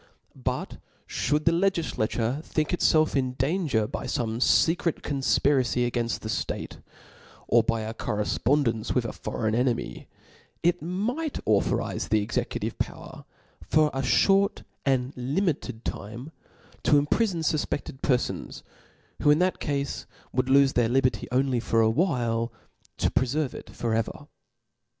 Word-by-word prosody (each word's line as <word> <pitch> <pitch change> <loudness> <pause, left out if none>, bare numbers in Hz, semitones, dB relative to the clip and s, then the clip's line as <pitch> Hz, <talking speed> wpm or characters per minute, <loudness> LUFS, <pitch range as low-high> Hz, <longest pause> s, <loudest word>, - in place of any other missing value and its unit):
But 65 - -3 0.3
(hould 150 +1 0
the 165 - +5
legiAature 160 - 0
think 155 -2 -1
itfelf 155 -3 +3
in 130 -2 +1
danger 135 - 0
by 130 - -5
fome 115 -2 -1
fecret 165 +6 +2
confpiracyiagainil 125 -5 +1
the - - -5
ftate, 110 - -4 0.7
or 120 - +5
by 115 0 0
a 110 +1 -4
correfpondence 115 +2 0
with 125 -2 +2
a 115 - -4
foreign 110 -2 -2
enemy, 125 0 -1 0.6
it 175 +1 +2
might 225 - -2
authorize 105 -2 +1
the 110 - +3
executive - - -3
power, - - -5 0.4
for 155 -1 +2
a 135 - -1
Ihort 195 +9 +3 0.2
and 130 0 +1
li 130 +9 -1
mited 145 - -2
time, 115 +9 -6 0.5
to 145 - +5
imprifon 170 +4 +1
fufpeded 145 -3 -2
perfons, 125 -4 -1 0.6
who - - +4
in 150 - +6
thilt 180 +2 +1
cafe 140 -2 -2 0.3
would 130 0 +1
lofe 135 0 +5
their 120 -2 +2
liberty 125 -4 +1
only 130 -1 +2
for 115 -1 +1
a 110 0 +3
while^ 120 -8 +1 0.5
to - - +1
preferve 135 +2 0
it - - -9
for 115 -2 -2
ever. 110 0 -2
130 Hz, 135 wpm, -26 LUFS, 115-155 Hz, 0.7 s, in